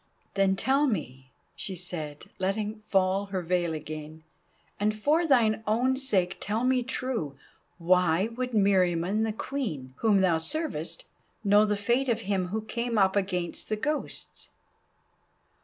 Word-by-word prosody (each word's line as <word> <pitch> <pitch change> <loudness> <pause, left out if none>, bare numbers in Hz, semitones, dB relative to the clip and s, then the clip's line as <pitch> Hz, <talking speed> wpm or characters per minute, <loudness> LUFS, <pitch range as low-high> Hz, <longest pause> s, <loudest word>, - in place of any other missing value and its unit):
"Then 195 -1 +3
tell 275 +8 +2
me," 130 - -4 0.2
she 195 - -5
said, 160 -4 -5
letting 210 +3 -1
fall 195 -1 +1
her 190 -2 -3
veil 175 -1 0
again, 155 +1 -7 0.6
"and 215 +1 +1
for 310 +9 +2
thine 225 -6 +3
own 245 +5 +2
sake 200 -10 +1
tell 215 +4 -1
me 255 0 +3
true, 240 - -3 0.4
why 180 +2 +3
would 250 0 -2
Meriamun 195 -1 +2
the 220 - -1
Queen, 205 - -4
whom 210 -4 +3
thou 175 -4 +3
servest, 315 - -2 0.4
know 205 +1 +5
the 210 -1 0
fate 240 +6 +1
of 230 -1 +1
him 195 -3 -1
who 215 +4 -2
came 235 +1 -2
up 190 -1 +4
against 180 -3 -2
the 215 - +1
Ghosts?" 300 +7 -4
200 Hz, 140 wpm, -28 LUFS, 180-235 Hz, 0.6 s, know